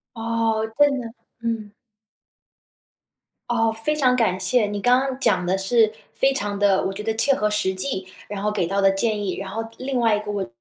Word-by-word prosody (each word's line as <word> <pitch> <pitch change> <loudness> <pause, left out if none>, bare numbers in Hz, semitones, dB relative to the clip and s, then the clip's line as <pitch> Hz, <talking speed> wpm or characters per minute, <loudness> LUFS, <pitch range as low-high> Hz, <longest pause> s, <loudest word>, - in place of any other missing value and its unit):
哦， 225 -1 0
真 290 -2 +4
的， 230 -2 -7 0.3
嗯。 225 -3 -3 1.8
哦， 225 -1 +2
非 225 +8 -1
常 255 -4 +3
感 220 -7 +1
谢， 210 +5 +2
你 205 0 -4
刚 245 +4 +4
刚 265 -1 -3
讲 185 -9 +1
得 185 +2 +1
是 215 +3 +3 0.2
非 270 0 +2
常 205 -4 -2
地 200 -2 +3
我 195 - -1
觉 200 +2 -6
得 220 +1 -1
切 275 +5 +3
合 210 -5 0
实 190 -3 0
际， 185 0 -3 0.2
然 200 -1 -5
后 210 - +1
给 190 -5 0
到 195 +3 -2
的 195 - +6
建 205 +1 -1
议。 185 - -2
然 195 0 -5
后 225 +4 -4
另 260 0 -2
外 230 -2 +3
一 210 - 0
个 210 0 -6
我 205 -1 -2
215 Hz, 220 characters per minute, -23 LUFS, 195-235 Hz, 1.8 s, 的